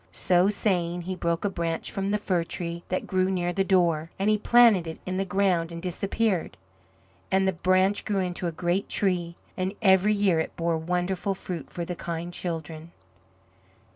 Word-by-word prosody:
So 180 +2 +3
saying, 180 -4 0
He 185 +2 -3
broke 170 +1 -1
a - - +2
branch 165 -2 -3
from 195 0 -2
the 210 - +2
fir 185 -4 0
tree 170 0 -5
that 185 - -1
grew 185 0 +1
near 175 -2 -1
the 195 - +1
door, 170 -5 +2
and 200 +2 +2
He 215 - +3
planted 225 -6 +5
it 160 - -6
in 185 0 -3
the 195 - 0
ground 180 -3 +1
and 170 - -6
disappeared. 185 - -1 0.7
And 190 0 +2
the 190 - +2
branch 185 +3 +2
grew 205 -2 -1
into 180 -1 -3
a - - -1
great 175 +4 -1
tree, 175 -4 0 0.2
and 190 +2 -2
every 195 0 +4
year 195 -5 +2
it 160 - -3
bore 165 -1 0
wonderful 180 +3 -1
fruit 175 -4 -6
for 170 - -5
the 180 - -4
kind 170 +1 -5
children. 165 -2 -5
180 Hz, 185 wpm, -26 LUFS, 170-195 Hz, 0.7 s, planted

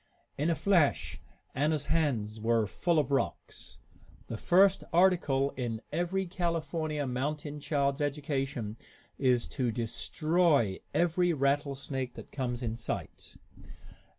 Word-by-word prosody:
In 145 +4 0
a 165 - +2
flash 175 -5 +2 0.3
Anna's 150 +1 +1
hands 120 -10 0
were 115 0 +2
full 170 - 0
of 145 -2 +1
rocks. 135 - -3 0.5
The 115 - -3
first 190 - +4
article 165 -6 +3
in 120 -3 -3
every 175 +4 0
California 165 -4 -2
mountain 145 +3 -3
child's 140 -1 0
education 135 -6 -2 0.4
is 125 -3 +3
to 125 -4 -1
destroy 120 - +1
every 175 +1 +2
rattlesnake 140 -2 -1
that - - -10
comes 125 -2 -3
in 115 -1 -2
sight. 115 - -5
145 Hz, 115 wpm, -30 LUFS, 125-165 Hz, 0.5 s, first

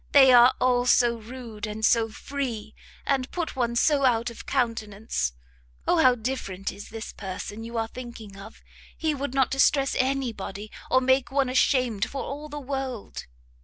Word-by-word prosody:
They 265 -2 +8
are 245 +1 +7
all 250 -1 +2
so 240 -1 +4
rude, 225 -2 -7
and 215 +1 -2
so 230 -1 +3
free, 230 -3 -5 0.3
and 265 -2 0
put 340 -4 -4
one 235 -2 0
so 280 +3 +3
out 240 -2 +2
of 235 - -12
countenance, 220 - -1 0.5
O - - +3
how 255 -1 +6
different 220 -6 -4
is 205 - -10
this 225 0 -7
person 205 +3 -6
you 230 +1 -6
are 225 0 0
thinking 230 -4 -9
of! 200 +3 -12 0.3
he 315 -2 0
would 280 -2 -4
not 265 -1 +2
distress 270 0 +3
anybody, 230 -6 -2 0.2
or 260 - +4
make 260 0 +2
one 270 -2 +1
ashamed 255 -4 +2
for 275 - -4
all 295 +2 -6
the 295 0 -6
world! 265 -4 -5
245 Hz, 165 wpm, -26 LUFS, 220-265 Hz, 0.5 s, They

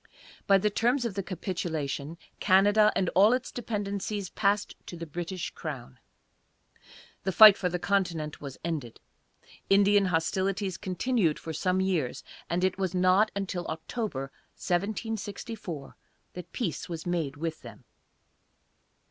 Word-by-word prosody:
By 195 - +6
the 210 +2 +1
terms 245 +4 +1
of 230 - -2
the 195 - -2
capitulation, 165 -5 -4 0.2
Canada 205 +2 +5
and 185 - +1
all 205 +5 +5
its 255 0 -2
dependencies 205 -3 -3
passed 205 0 +1
to 175 - -7
the 165 - -6
British 175 +3 -5
crown. 135 - -7 1.2
The 190 - -1
fight 210 +2 +10
for 180 - -1
the 180 - -2
continent 175 -5 -1
was 140 -2 -7
ended. 150 -9 -4 0.7
Indian 200 0 +5
hostilities 190 +2 0
continued 185 -2 0
for 160 - -6
some 185 +4 0
years, 175 -9 -1 0.3
and 175 +1 0
it 185 0 +1
was 190 -1 -1
not 185 +4 +4
until 190 -3 -3
October, 160 - -4 0.2
1764, 205 - -4 0.4
that 180 -1 -9
peace 195 - -3
was 165 -2 -5
made 165 -6 -2
with 160 +1 -4
them. - - -12
185 Hz, 130 wpm, -28 LUFS, 165-205 Hz, 1.2 s, fight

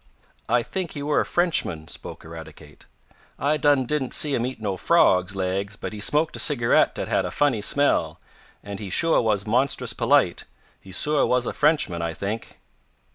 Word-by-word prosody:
"I 120 -1 +2
think 180 +6 -5
he 145 - -6
were 150 +1 +1
a - - 0
Frenchman," 155 - -1
spoke - - -8
Eradicate. 80 -1 -12 0.5
"I 145 +4 +1
done 145 -2 +2
didn't 135 -1 -1
see 150 -2 +3
him 120 -1 0
eat 130 - -7
no 100 -3 -2
frogs' 90 +1 +2
laigs, 95 +2 -2
but - - -7
he 105 - -7
smoked 150 +9 +1
a - - -6
cigarette 120 -6 +2
dat - - -4
had - - +1
a - - -3
funny 140 -7 +1
smell, 140 +7 +1 0.4
and 100 -1 -7
he 100 -3 -6
suah 165 - +3
was 105 -4 0
monstrous 125 +5 0
polite. - - +2 0.3
He 95 - -14
suah 150 +9 +1
was 125 -1 +1
a - - -3
Frenchman. 145 - +1
I 85 -1 -3
think." 105 +3 -5
120 Hz, 185 wpm, -23 LUFS, 95-145 Hz, 0.5 s, see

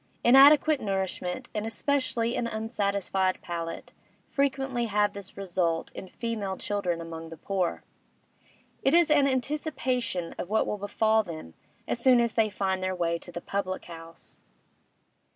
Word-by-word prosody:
Inadequate 285 +4 +7
nourishment, 190 +2 -2
and 210 - -2
especially 235 0 0
an 235 - -1
unsatisfied 200 -4 -1
palate, 165 -1 -5 0.3
frequently 270 -3 0
have 210 -1 +1
this 200 -2 -9
result 175 -4 -1
in 190 - -8
female 210 -3 -4
children 185 -5 -1
among 165 -1 -7
the 165 - -9
poor; 185 +1 -2 1.0
it 270 - +3
is 340 -3 +5
an 290 -2 +5
anticipation 260 - -1
of 180 - -4
what 220 +1 +2
will 210 - -3
befall 220 +2 +2
them 160 - -8 0.3
as - - -1
soon 250 0 +5
as 235 -2 +1
they 220 -2 +2
find 190 -2 -1
their 185 0 -1
way 170 -1 0
to 175 - -10
the 175 - -6
public 190 -1 -3
house. 165 -1 -11
205 Hz, 145 wpm, -28 LUFS, 180-245 Hz, 1.0 s, Inadequate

